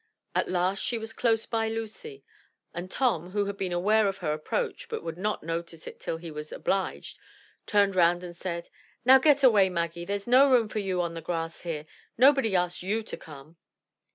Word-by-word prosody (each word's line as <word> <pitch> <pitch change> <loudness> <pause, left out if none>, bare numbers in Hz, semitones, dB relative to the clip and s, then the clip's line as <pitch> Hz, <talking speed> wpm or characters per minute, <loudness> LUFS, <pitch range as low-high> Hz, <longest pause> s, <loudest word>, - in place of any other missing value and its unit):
At - - 0
last 185 +2 0
she 235 - -1
was 225 0 -5
close 225 -2 +1
by 225 -1 -1
Lucy; 225 - -6 0.5
and 175 +2 -6
Tom, 185 - 0
who 205 +1 0
had 200 0 -4
been 190 -2 -3
aware 205 +5 +3
of 195 0 -2
her 155 -4 -1
approach, 305 - -3
but 455 - -4
would 165 - -5
not 210 +4 -2
notice 165 0 -4
it - - -9
till 160 - -3
he 165 0 -8
was 150 0 -7
obliged, 195 -1 -2 0.5
turned 200 -2 +3
round 175 0 +3
and 175 -1 -8
said, 170 -1 -5 0.2
— - - -35
"Now 265 +1 +8
get 285 0 +4
away, 210 -7 +6
Maggie; 170 -1 -3
there's 200 +1 -3
no 260 +3 +6
room 240 -4 +4
for 215 - -3
you 185 -3 -1
on 170 -1 -3
the 165 - -6
grass 165 0 -4
here. 155 -3 -4 0.3
Nobody 260 -5 +5
asked 175 -1 0
you 210 +5 -1
to - - -6
come." 155 +1 -13
190 Hz, 205 wpm, -27 LUFS, 170-225 Hz, 0.5 s, Now